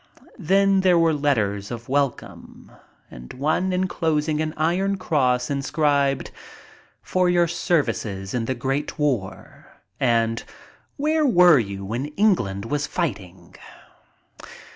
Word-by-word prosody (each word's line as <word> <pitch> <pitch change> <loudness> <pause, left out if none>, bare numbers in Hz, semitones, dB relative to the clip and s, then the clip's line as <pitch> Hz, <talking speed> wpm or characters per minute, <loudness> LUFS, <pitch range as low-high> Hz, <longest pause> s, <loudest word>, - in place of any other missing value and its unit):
Then 195 +2 +3
there 185 -2 +4
were 165 -1 +3
letters 110 -9 -1
of 120 -1 -7
welcome 140 -1 -3 0.4
and 60 0 -11
one 155 +7 0
inclosing 160 -4 -1
an 155 0 -3
iron 185 +5 0
cross 130 -8 0
inscribed, 140 -1 0 0.7
"For 185 -1 +1
your 175 -1 +3
services 115 - -2
in 120 -2 -1
the 130 - -2
great 135 +4 -3
war," 105 -11 -3 0.3
and 115 -2 +1 0.5
"Where 305 +1 +1
were 175 - +6
you 100 -3 -5
when 120 +8 -3
England 125 - +1
was 145 +4 -2
fighting?" 100 - -5
145 Hz, 115 wpm, -23 LUFS, 115-175 Hz, 0.7 s, were